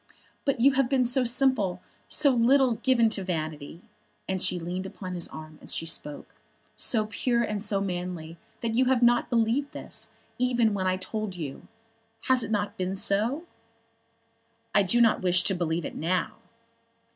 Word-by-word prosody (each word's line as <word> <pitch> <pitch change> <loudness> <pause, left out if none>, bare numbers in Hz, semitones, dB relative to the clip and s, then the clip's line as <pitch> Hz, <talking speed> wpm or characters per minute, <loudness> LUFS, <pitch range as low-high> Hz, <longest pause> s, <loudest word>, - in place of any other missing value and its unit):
But 275 -4 +1
you 270 +4 +6
have 270 -2 +1
been 265 -2 +2
so 250 +2 +2
simple, 235 -7 +2 0.3
so 290 -2 +5
little 255 +1 +4
given 235 0 +3
to 200 -3 -1
vanity," 155 -2 -5 0.6
she 180 0 +1
leaned 180 +3 -4
upon 185 -1 -7
his 175 -2 -2
arm 155 0 -10
as - - -3
she - - -3
spoke, 150 -2 -5 0.4
"so 220 -3 +2
pure 235 +3 0
and 210 -3 -2
so 205 -1 +1
manly, 175 -3 -4 0.2
that 230 -1 -1
you 255 +3 +3
have 250 -1 +2
not 240 0 +4
believed 235 +4 +1
this, - - -5 0.3
even 245 -3 +2
when 190 -2 -1
I 185 0 +1
told 205 +1 -4
you. 150 -6 -7 0.5
Has 260 -2 +3
it - - -5
not 205 -2 -1
been 185 +1 -2
so?" 220 - 0 1.3
"I 205 - +5
do 200 +5 +2
not 230 -2 +4
wish 180 -1 +3
to 195 - +1
believe 170 -2 -1
it - - -5
now." 180 +4 -1
210 Hz, 170 wpm, -27 LUFS, 180-240 Hz, 1.3 s, you